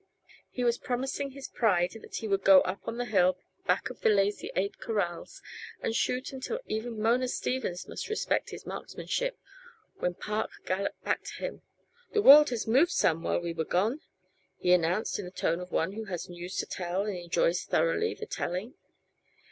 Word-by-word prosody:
He 250 - -3
was 235 -1 +2
promising 265 +2 -2
his 275 0 -8
pride 180 -6 +2
that - - -10
he 220 - -3
would 195 -1 +1
go 190 -1 +8
up 185 +2 -4
on 230 +1 -3
the 245 - -1
hill, 185 -5 +3 0.3
back - - +1
of - - -13
the - - +4
Lazy 205 0 +2
Eight 195 +2 -1
corrals, 195 -7 -3 0.4
and 225 - -2
shoot 255 +3 0
until 265 - -4
even 220 +1 -3
Mona 240 +4 +2
Stevens 245 -8 -2
must - - -6
respect 435 - 0
his - - -9
marksmanship, - - -3 0.6
when 180 0 -1
Park 215 +3 -2 0.2
galloped 195 +2 -2
back - - 0
to - - -6
him - - -5 0.5
"The 425 -2 +2
world 295 +2 +10
has 240 -3 -2
moved 265 +10 +4
some 165 - +2
while 175 - 0
we 170 -1 -3
was 160 -1 -3
gone," 220 - +1 0.6
he 180 - +1
announced 180 +5 +1
in 200 - -4
the - - -6
tone 170 -2 -1
of 180 0 -8
one 165 +4 +1
who 220 +2 -6
has 180 -4 -5
news 175 +1 -7
to - - 0
tell 180 +2 -2
and 210 -2 -2
enjoys 180 - +1
thoroughly 445 -3 +1
the 440 - -6
telling. 210 - -3
215 Hz, 190 wpm, -29 LUFS, 180-255 Hz, 0.6 s, world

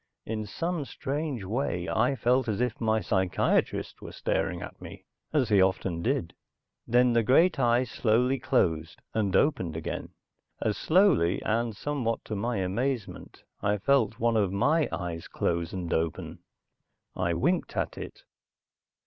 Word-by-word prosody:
In 110 -1 -3
some 165 - -2
strange 140 -3 -4
way 95 -4 -2
I 125 +7 +2
felt 125 +1 +2
as 110 -1 -1
if 125 -2 -1
my 110 -1 +2
psychiatrist 95 -2 0
were - - -8
staring - - -1
at - - -10
me, - - -10 0.3
as 140 -7 +1
he 100 -3 +5
often 95 -2 +1
did. 120 -6 -1 0.5
Then 125 +1 +4
the 115 - +4
great 145 - +4
eye 120 0 +3
slowly 125 +2 +1
closed, 80 - 0
and 100 -4 0
opened 95 - +1
again. 80 - -4 0.5
As 105 - 0
slowly, 155 - +3
and 115 0 0
somewhat 130 -6 -2
to 110 - -4
my 115 +3 -1
amazement, 110 +5 -3 0.2
I 105 0 +1
felt 115 0 +2
one 115 0 +2
of 100 -4 +2
my 150 +11 +2
eyes 85 -2 -4
close 85 -1 -1
and 90 -3 -3
open. 80 -1 -2 0.8
I 85 -2 0
winked 175 - 0
at - - -1
it. - - -9
115 Hz, 150 wpm, -28 LUFS, 95-130 Hz, 0.8 s, he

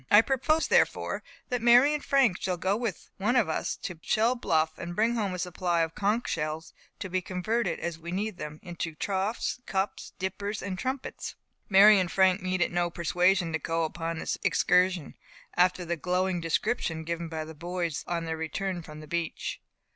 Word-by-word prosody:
"I 210 - +8
propose, 275 +6 +1
therefore, - - +2 0.3
that 245 -2 -1
Mary 245 +5 +6
and 300 - -2
Frank 260 -10 +3
shall 185 -1 -1
go 190 +3 +1
with 225 -5 -4
one 210 +6 +1
of 240 -8 +4
us 160 - -1
to 180 -4 -5
Shell 225 +7 +2
Bluff, 160 -7 +1
and 175 0 -5
bring 225 +4 +2
home 205 -5 -1
a - - -4
supply 175 -1 0
of 165 0 -1
conch 210 +5 0
shells, 155 +1 -3 0.2
to - - -5
be 185 0 -1
converted, 205 +7 -1
as 170 -1 -4
we 170 +1 -7
need 200 +1 -2
them, 150 -1 -7
into 170 -2 -5
troughs, 200 +8 -2
cups, 190 +1 -2
dippers, 200 +2 -3
and 185 -1 -4
trumpets." 260 +4 -4 0.3
Mary 200 +1 +8
and 180 -2 -1
Frank 190 0 +4
needed 185 -1 0
no 175 0 +1
persuasion 175 +1 +2
to 160 - 0
go 165 +2 -1
upon 165 +1 -3
this - - -3
excursion, 180 -3 +2 0.4
after 180 0 +3
the 170 0 -2
glowing 180 +2 0
description 165 0 -1
given 170 +1 -3
by 160 -1 -4
the 160 - -9
boys 170 -1 -3
on 170 -1 -2
their 160 0 -3
return 175 +3 -3
from 155 -1 -10
the 155 - -11
beach. 170 +1 -3
180 Hz, 185 wpm, -28 LUFS, 165-205 Hz, 0.4 s, I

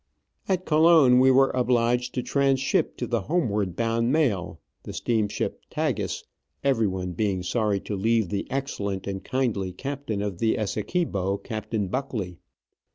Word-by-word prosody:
At 185 -1 0
Colon 155 -5 +6
we 130 +1 +6
were 135 +1 +5
obliged 125 0 +1
to 125 - -1
tranship 135 -1 +1
to 125 - -2
the 120 -2 -1
homeward 105 - 0
bound 115 +2 +1
mail, 130 - 0 0.2
the - - -11
ss. 110 -3 0 0.2
Tagus, - - -2 0.4
everyone 100 -9 +1
being 95 0 -1
sorry 105 +1 0
to 105 - -4
leave 110 0 +1
the 100 -1 -3
excellent 100 -8 -3
and 95 -1 -4
kindly 115 -8 -1
captain 135 -1 -4
of 100 -4 -4
the 110 -1 +2
Essequibo, 100 - -1
Captain 110 -2 -3
Buckley. 100 -7 -4
115 Hz, 140 wpm, -26 LUFS, 100-130 Hz, 0.4 s, Colon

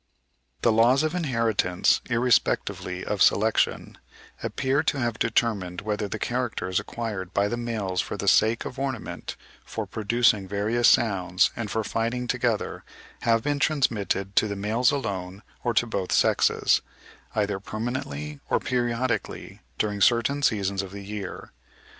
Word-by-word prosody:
The 115 - +5
laws 120 +6 +4
of 155 +1 0
inheritance, 115 - +1
irrespectively 115 -6 +1
of 105 - -2
selection, 110 +2 +2 0.4
appear 135 +2 0
to - - 0
have 120 -3 -1
determined 105 -6 0
whether 105 0 -2
the 110 - -4
characters 115 -7 -1
acquired 105 -6 -5
by 100 0 +3
the 120 - -2
males 110 -6 -2
for - - -5
the 100 - -4
sake 110 +3 +4
of 130 - -6
ornament, 135 -4 -4 0.3
for - - -5
producing 110 -2 +1
various 105 +5 +1
sounds, 95 -5 +3
and 110 -3 -4
for 110 +2 -1
fighting 115 +3 -2
together, 120 - -1 0.4
have 115 -1 +2
been 145 -1 0
transmitted 105 -10 0
to 110 - +5
the 100 - -3
males 110 +5 +2
alone 100 -7 -3 0.2
or 120 - +1
to 120 - +4
both 100 -5 -3
sexes, - - +3 0.5
either 100 -2 0
permanently, 95 - -5
or - - +2
periodically 120 -2 -2 0.2
during 105 -1 -1
certain 120 +6 +3
seasons 100 -6 +1
of 95 - -7
the 100 +1 -9
year. 100 -2 -6
110 Hz, 140 wpm, -26 LUFS, 100-120 Hz, 0.5 s, The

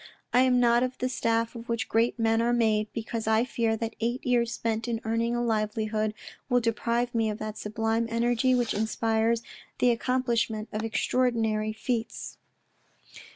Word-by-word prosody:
" - - -39
I 245 - +5
am 255 -1 +4
not 240 0 +4
of 255 0 -1
the 255 - -1
stuff 230 -2 0
of 235 0 -9
which 230 -1 -1
great 230 +2 +1
men 225 0 +2
are 240 +1 +2
made, 220 -3 +2
because 225 -1 -4
I 220 +2 +3
fear 230 -3 0
that 225 0 -4
eight 240 +3 -2
years 240 -2 +2
spent 225 -1 -2
in 230 -1 -1
earning 230 +1 0
a 240 - 0
livelihood 215 -1 -1 0.3
will 245 -1 +4
deprive 235 +1 0
me 225 -2 +1
of 210 - -3
that 215 -1 -5
sublime 225 +1 -1
energy 240 +2 +2
which 240 -2 0
inspires 225 +1 +1 0.3
the 250 - +4
accomplishment 235 -3 0
of 215 +1 -2
extraordinary 225 -2 0
feats." 225 +1 -4
230 Hz, 170 wpm, -27 LUFS, 220-240 Hz, 0.3 s, I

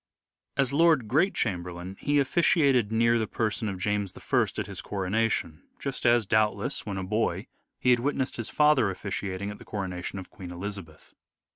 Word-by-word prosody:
As 140 -1 +2
Lord 155 -6 +4
Great 160 - +2
Chamberlain 90 -2 -3
he 145 0 +1
officiated 140 -5 +3
near 115 +1 +3
the 110 - -1
person 110 0 -1
of 95 - -4
James 100 0 -1
I - - +2
at - - -1
his - - -5
coronation, 100 -4 -1 0.2
just 135 -3 -2
as, 120 -2 +4
doubtless, 105 0 +1
When 100 -2 -3
a 95 - -3
boy, 105 +4 -1 0.3
he 125 - +3
had 120 - +5
witnessed 135 0 -1
his 115 - -4
father 150 -8 +4
officiating 100 0 -4
at 105 - -10
the - - -11
coronation 95 -2 -4
of 95 - -8
Queen 95 -3 -9
Elizabeth. 90 -3 -8
105 Hz, 170 wpm, -27 LUFS, 95-125 Hz, 0.3 s, had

